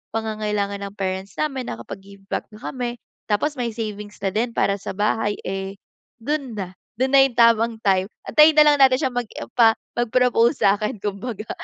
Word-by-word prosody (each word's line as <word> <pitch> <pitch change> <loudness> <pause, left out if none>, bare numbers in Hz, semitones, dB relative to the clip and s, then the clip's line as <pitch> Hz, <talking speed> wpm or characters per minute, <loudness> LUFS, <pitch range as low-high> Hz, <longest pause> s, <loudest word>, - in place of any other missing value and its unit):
pangangailangan 210 -2 -2
ng 200 - -11
parents 190 0 -4
namin, 270 -4 -2
nakapag-give 195 +12 -10
back - - -2
na 215 - -14
kami, 245 -2 -5 0.2
tapos 260 +9 0
may 240 -2 -2
savings 210 -2 -6
na 195 - 0
din 225 +5 -1
para 200 -2 +1
sa 200 - -6
bahay 210 +1 0
eh, 195 +1 -4 0.5
dun 280 -1 -2
na 190 -3 -5 0.3
dun 260 - +2
na 270 - +8
yung 270 - -3
tamang 230 -1 +4
time. 190 -3 +2 0.2
Antayin 305 +1 +7
na 305 0 +7
lang 295 -1 +5
natin 265 -2 +5
siyang 260 -4 -1
mag-empa 230 -1 +2 0.2
mag-propose 240 +1 +2
sa'kin 205 +2 +1
kumbaga, 210 +2 -5
220 Hz, 170 wpm, -22 LUFS, 200-250 Hz, 0.5 s, na